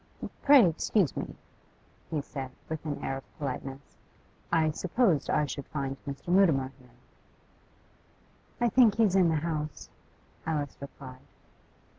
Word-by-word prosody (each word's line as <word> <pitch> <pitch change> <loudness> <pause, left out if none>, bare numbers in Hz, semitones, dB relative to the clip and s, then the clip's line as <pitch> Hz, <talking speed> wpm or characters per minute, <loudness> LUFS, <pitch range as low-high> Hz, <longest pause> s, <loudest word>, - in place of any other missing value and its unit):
'Pray 275 -8 +7
excuse 170 +1 +1
me,' - - -5 0.7
he 155 -2 -1
said, 135 -2 -6 0.2
with 160 -1 -4
an 145 - -4
air 135 - -2
of 135 - -14
politeness. 135 -1 -6 0.5
'I 160 -2 +3
supposed 180 - +1
I 150 - +2
should 140 -1 -6
find 135 -2 -3
Mr. 140 +4 -6
Mutimer 160 -8 +4
here.' 125 -1 -19 1.7
'I 240 0 +3
think 230 -4 +5
he's 215 -4 +3
in 185 -3 +5
the 160 - +2
house,' 155 -2 -3 0.6
Alice 150 -3 -1
replied. 130 -2 -10
150 Hz, 130 wpm, -29 LUFS, 140-180 Hz, 1.7 s, Pray